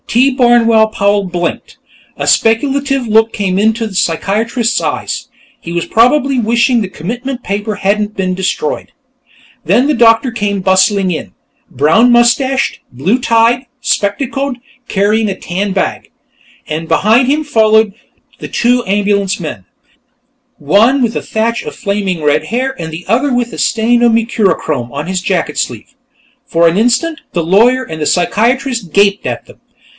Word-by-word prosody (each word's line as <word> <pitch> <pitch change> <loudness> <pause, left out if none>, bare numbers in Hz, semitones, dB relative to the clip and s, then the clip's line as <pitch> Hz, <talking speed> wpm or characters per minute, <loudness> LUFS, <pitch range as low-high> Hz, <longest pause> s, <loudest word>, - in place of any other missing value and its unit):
T. 255 +4 +3
Barnwell 230 -3 +4
Powell 205 -2 +1
blinked. 175 -2 -4 0.4
A - - -3
speculative 270 +3 +1
look 220 +1 +3
came 190 -3 -2
into 220 +2 +1
the 210 - -9
psychiatrist's 220 +8 0
eyes; - - -4 0.3
he 170 - -8
was 170 0 -2
probably 265 +4 +2
wishing 235 +1 +2
the 195 - -3
commitment 245 - -5
paper 205 +2 -3
hadn't 205 +1 -1
been 185 -1 -1
destroyed. 460 - -3 0.7
Then 255 +3 +2
the 300 - +2
doctor 230 0 +4
came 205 -3 -2
bustling 190 0 +2
in, 160 - -5 0.4
brown 165 - +3
mustached, 260 +3 +2
blue 170 - 0
tied, 235 +2 +2
spectacled, 265 +6 -2 0.3
carrying 210 +2 +1
a 195 - -4
tan 195 +3 -3
bag, 190 - -2 0.6
and 160 +1 -5
behind 220 +9 +3
him 300 +2 0
followed 220 -5 +3 0.5
the - - -7
two 245 +1 +1
ambulance 200 -1 0
men, 150 - -6 0.9
one 220 - +3
with 230 -2 0
a - - -2
thatch 230 +2 -2
of - - -7
flaming 200 -6 -3
red 150 +1 +1
hair 260 +7 -2
and 160 0 -5
the 165 +3 -8
other 255 +7 +1
with 245 -1 -1
a - - -7
stain 230 +2 +1
of 240 -1 +4
mercurochrome 190 - 0
on 145 +3 -5
his 185 -1 -2
jacket 175 -6 -2
sleeve. 120 - -4 0.5
For 170 0 +2
an 165 - +1
instant, 250 +9 +1
the 170 - -1
lawyer 235 +9 +3
and 160 -8 -8
the 150 - 0
psychiatrist 230 - 0
gaped 200 +2 +2
at - - -4
them. - - -18
220 Hz, 150 wpm, -13 LUFS, 190-240 Hz, 0.9 s, Barnwell